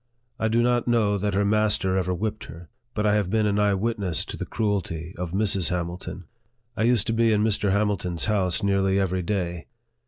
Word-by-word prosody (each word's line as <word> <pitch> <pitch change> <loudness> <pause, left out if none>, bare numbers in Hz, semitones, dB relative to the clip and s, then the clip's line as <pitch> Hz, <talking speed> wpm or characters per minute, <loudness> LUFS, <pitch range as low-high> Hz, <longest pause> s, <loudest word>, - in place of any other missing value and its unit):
I 110 - +1
do 115 +2 +2
not 120 -1 +1
know 105 -4 +2
that 100 0 -1
her 100 +1 +2
master 105 -3 +2
ever 90 -1 0
whipped 110 +4 -3
her, 85 +1 -11 0.3
but 105 -1 0
I 105 - +3
have 105 -3 +1
been 110 +1 +1
an 105 0 +1
eye 105 -1 +3
witness 100 -5 -1
to - - -6
the - - -6
cruelty 95 -6 -2
of 90 -1 -5
Mrs. 95 -3 +1
Hamilton. 90 +1 -4 0.5
I 110 - +1
used 120 -4 +3
to 115 - -1
be 115 0 +3
in 105 -1 +2
Mr. 105 -2 +1
Hamilton's 100 -4 0
house 100 -2 0
nearly 100 -1 +2
every 95 -1 0
day. 90 -3 -3
100 Hz, 205 wpm, -25 LUFS, 90-110 Hz, 0.5 s, I